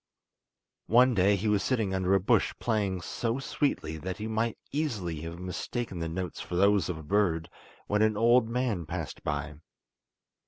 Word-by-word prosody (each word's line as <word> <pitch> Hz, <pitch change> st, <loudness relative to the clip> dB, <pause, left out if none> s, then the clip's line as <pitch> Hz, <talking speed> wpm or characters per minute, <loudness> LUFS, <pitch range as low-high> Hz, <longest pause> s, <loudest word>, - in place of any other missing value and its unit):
One 125 Hz, +3 st, +5 dB
day 100 Hz, 0 st, +4 dB
he 100 Hz, +3 st, -2 dB
was 105 Hz, -2 st, +3 dB
sitting 110 Hz, -6 st, 0 dB
under 95 Hz, 0 st, +2 dB
a -, -, +4 dB
bush 95 Hz, -, +2 dB
playing 100 Hz, -5 st, -1 dB
so 115 Hz, +7 st, -2 dB
sweetly 135 Hz, -, -1 dB
that 90 Hz, +5 st, -5 dB
you 110 Hz, +1 st, -4 dB
might 110 Hz, +1 st, -1 dB
easily 105 Hz, -, -2 dB
have 80 Hz, +1 st, -6 dB
mistaken 90 Hz, +3 st, -4 dB
the 80 Hz, 0 st, -2 dB
notes 90 Hz, +2 st, -4 dB
for 90 Hz, -, -5 dB
those 100 Hz, -1 st, +3 dB
of 90 Hz, -, -2 dB
a 80 Hz, -, -9 dB
bird, 85 Hz, -2 st, +1 dB, 0.3 s
when 105 Hz, +1 st, +1 dB
an 110 Hz, -1 st, +3 dB
old 120 Hz, +1 st, +4 dB
man 115 Hz, -9 st, -1 dB
passed 80 Hz, -5 st, -5 dB
by. 75 Hz, 0 st, -3 dB
100 Hz, 170 wpm, -29 LUFS, 85-115 Hz, 0.3 s, One